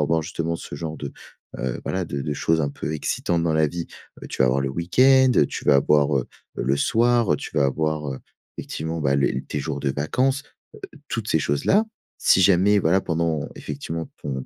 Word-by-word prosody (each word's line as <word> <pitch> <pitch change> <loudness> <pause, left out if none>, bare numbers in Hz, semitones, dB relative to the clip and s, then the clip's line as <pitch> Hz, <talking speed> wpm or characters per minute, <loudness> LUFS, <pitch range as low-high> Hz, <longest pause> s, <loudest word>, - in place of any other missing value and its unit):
avoir 80 +2 +1
justement 85 0 -3
ce 75 - -7
genre 80 +1 -5
de, 70 - -6 0.5
heu, 65 0 -3
voilà, 95 0 -2
de 70 -4 -4
de 75 - -2
choses 80 +3 +1
un 70 - 0
peu 75 - -5
excitantes 85 +2 -1
dans 85 -1 +1
la 80 0 +3
vie. 85 +3 -5 0.4
Heu, - - -6
tu - - 0
vas - - +4
avoir 65 +2 +2
le 70 - -1
week-end, 130 - +4 0.2
tu - - -6
vas 75 - +5
avoir, 75 +1 +3
heu, 65 - -4 0.3
le 65 +3 0
soir, 115 +1 +2
tu - - -7
vas 70 - +4
avoir, 75 0 -1
heu, 65 - -7 0.4
effectivement, 80 +1 -4
bah, 70 -2 +2
les 70 -1 0
tes 75 - -4
jours 70 0 -4
de 70 -1 0
vacances, 130 - 0 0.5
heu, - - -14
toutes 110 -2 -3
ces 80 - +3
choses-là. 75 - +2 0.3
Si 95 - +4
jamais, 95 +3 +4
voilà, 90 +2 +3
pendant, 80 -3 -1
effectivement, 80 0 -6
ton 65 -3 -4
80 Hz, 205 wpm, -23 LUFS, 70-85 Hz, 0.5 s, vas